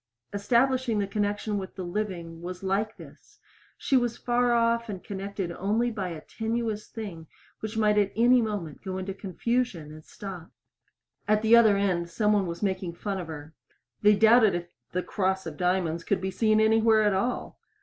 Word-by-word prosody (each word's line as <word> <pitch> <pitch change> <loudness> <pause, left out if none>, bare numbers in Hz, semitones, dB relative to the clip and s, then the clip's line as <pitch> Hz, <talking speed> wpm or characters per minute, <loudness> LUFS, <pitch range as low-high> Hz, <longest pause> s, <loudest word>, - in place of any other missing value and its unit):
Establishing 240 +3 +2
the 205 - +1
connection 205 +1 -1
with 190 +1 -8
living 175 -3 -4
was 180 +1 -7
like 200 +3 -1
this. - - -15 0.4
She 275 - 0
was 240 -2 +1
far 245 0 +1
off 235 0 +2
and 190 -3 -6
connected 200 -3 -4
only 215 +7 0
by 200 -4 -3
a 160 -3 -7
tenuous 225 +1 -3
thing 185 -8 -8 0.3
which 220 +1 -5
might 210 -1 +3 0.2
any 245 +3 +5
moment 205 -9 -4
go 190 -2 -4
into 190 +1 -4
confusion 195 -3 -2
and 155 0 -12
stop. 180 -3 -9 0.8
At 215 +1 +2
the 225 +1 +7
other 220 -4 +6
end 180 -4 0
some 210 +5 +1
one 200 -3 +2
was 170 +3 -5
making 185 -3 -2
fun 195 +1 -3
of 175 - -6
her. 155 -1 -8 0.5
They 210 0 +6
doubted 220 -1 +5
if 175 0 -5 0.2
"The 180 0 -1
Cross 190 -2 -1
of 160 -2 -6
Diamonds" 180 -1 0
could 200 - 0
be 190 +1 -3
seen 215 +2 +2
anywhere 220 0 +4
at 210 -1 +3
all. 240 +6 -2
205 Hz, 175 wpm, -27 LUFS, 180-220 Hz, 0.8 s, the